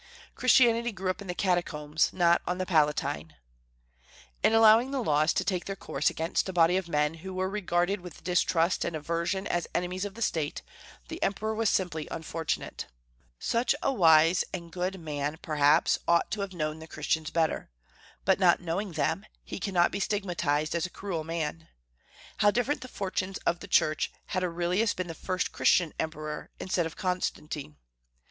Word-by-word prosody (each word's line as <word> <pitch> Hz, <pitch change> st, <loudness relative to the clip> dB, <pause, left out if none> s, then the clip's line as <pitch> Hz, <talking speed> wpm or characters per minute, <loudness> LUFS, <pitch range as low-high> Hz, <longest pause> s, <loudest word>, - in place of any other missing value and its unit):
"Christianity 240 Hz, -2 st, +4 dB
grew 190 Hz, -2 st, -2 dB
up 195 Hz, -, -8 dB
in 200 Hz, -, -8 dB
the 180 Hz, -, -3 dB
Catacombs, 160 Hz, -5 st, 0 dB
not 170 Hz, -2 st, +3 dB
on 180 Hz, -, -1 dB
the 185 Hz, -, -2 dB
Palatine." 150 Hz, -2 st, 0 dB, 1.1 s
In -, -, +4 dB
allowing 225 Hz, +2 st, +6 dB
the 275 Hz, -1 st, -2 dB
laws 155 Hz, -2 st, +3 dB
to -, -, 0 dB
take 180 Hz, -3 st, -1 dB
their 195 Hz, -, -4 dB
course -, -, 0 dB
against 165 Hz, +4 st, -1 dB
a -, -, -4 dB
body 170 Hz, 0 st, +4 dB
of 185 Hz, -2 st, -1 dB
men 150 Hz, 0 st, +1 dB
who 190 Hz, +1 st, -7 dB
were 185 Hz, 0 st, 0 dB
regarded 190 Hz, -1 st, 0 dB
with 175 Hz, -3 st, -11 dB
distrust 175 Hz, -1 st, +2 dB
and 170 Hz, -, -3 dB
aversion 170 Hz, +5 st, -2 dB
as 175 Hz, -1 st, -1 dB
enemies 180 Hz, +2 st, -1 dB
of 205 Hz, 0 st, -5 dB
the 230 Hz, -, -2 dB
State, 155 Hz, -7 st, -2 dB, 0.4 s
the 330 Hz, +2 st, -7 dB
Emperor 215 Hz, +2 st, -1 dB
was 220 Hz, -1 st, +1 dB
simply 165 Hz, -5 st, -1 dB
unfortunate. 160 Hz, -1 st, -4 dB, 0.5 s
So 235 Hz, -, 0 dB, 0.2 s
wise 170 Hz, -, +5 dB
and 170 Hz, -2 st, -6 dB
good 180 Hz, +2 st, -2 dB
a -, -, -9 dB
man, 150 Hz, -2 st, -3 dB
perhaps, 150 Hz, 0 st, +3 dB
ought 170 Hz, 0 st, +3 dB
to 210 Hz, -, -2 dB
have 195 Hz, -1 st, -4 dB
known 155 Hz, -1 st, -2 dB
the 160 Hz, -, -10 dB
Christians 155 Hz, +1 st, -1 dB
better; 165 Hz, -2 st, 0 dB, 0.6 s
but, 190 Hz, 0 st, +3 dB
not 180 Hz, -2 st, +5 dB
knowing 180 Hz, +2 st, -3 dB
them, 160 Hz, +7 st, -1 dB, 0.2 s
he -, -, -6 dB
cannot 180 Hz, -3 st, +2 dB
be 200 Hz, -, -3 dB
stigmatized 170 Hz, -8 st, 0 dB
as 170 Hz, +1 st, 0 dB
a -, -, -15 dB
cruel 180 Hz, -4 st, -4 dB
man. 160 Hz, 0 st, -4 dB, 0.7 s
How 205 Hz, -, +5 dB
different 245 Hz, +7 st, 0 dB
the 255 Hz, -, -7 dB
fortunes 190 Hz, -3 st, -3 dB
of 170 Hz, 0 st, +1 dB
the -, -, -9 dB
Church 155 Hz, 0 st, +2 dB, 0.2 s
had 185 Hz, -1 st, -1 dB
Aurelius 180 Hz, +5 st, 0 dB
been 185 Hz, -, -2 dB
the -, -, -4 dB
first 185 Hz, +3 st, -2 dB
Christian 175 Hz, -4 st, +3 dB
emperor 155 Hz, -1 st, -4 dB
instead 180 Hz, -3 st, 0 dB
of 160 Hz, -, -10 dB
Constantine! 155 Hz, -, -3 dB
175 Hz, 175 wpm, -28 LUFS, 160-195 Hz, 1.1 s, allowing